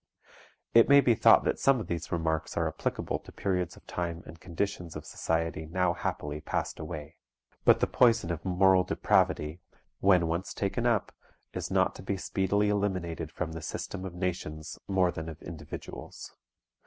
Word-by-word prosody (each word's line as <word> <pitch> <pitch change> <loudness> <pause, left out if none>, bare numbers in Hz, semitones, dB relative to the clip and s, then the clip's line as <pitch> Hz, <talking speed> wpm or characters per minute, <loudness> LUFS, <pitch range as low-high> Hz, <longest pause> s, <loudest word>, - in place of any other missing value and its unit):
It 115 +2 +7
may 140 0 +9
be 125 -4 +4
thought - - +6
that - - 0
some 135 -2 +4
of 110 - -4
these 85 -1 -4
remarks 80 -2 -1
are - - +2
applicable - - -2
to - - -14
periods 90 -3 -2
of - - -18
time 85 0 -4
and 80 +1 -11
conditions 90 -1 -3
of 75 - -7
society 80 -1 -2
now 90 +1 +1
happily 75 -3 -4
passed - - -3
away. 75 -2 -7 0.5
But - - +6
the - - +5
poison 115 -8 +3
of 85 -1 -4
moral 95 0 +4
depravity, 80 -2 +1 0.4
when 95 -3 +4
once 85 +3 -2
taken 115 +5 0
up, 115 -5 +1 0.4
is - - -4
not - - +2
to - - -10
be 95 +1 -2
speedily 100 +3 +1
eliminated 90 -6 -1
from 85 -1 -4
the 80 0 -6
system 95 +4 -5
of 95 -2 -6
nations 85 -4 -4
more 95 -2 +2
than 80 -1 -6
of 80 0 -9
individuals. 80 -1 -8
90 Hz, 170 wpm, -29 LUFS, 80-95 Hz, 0.5 s, may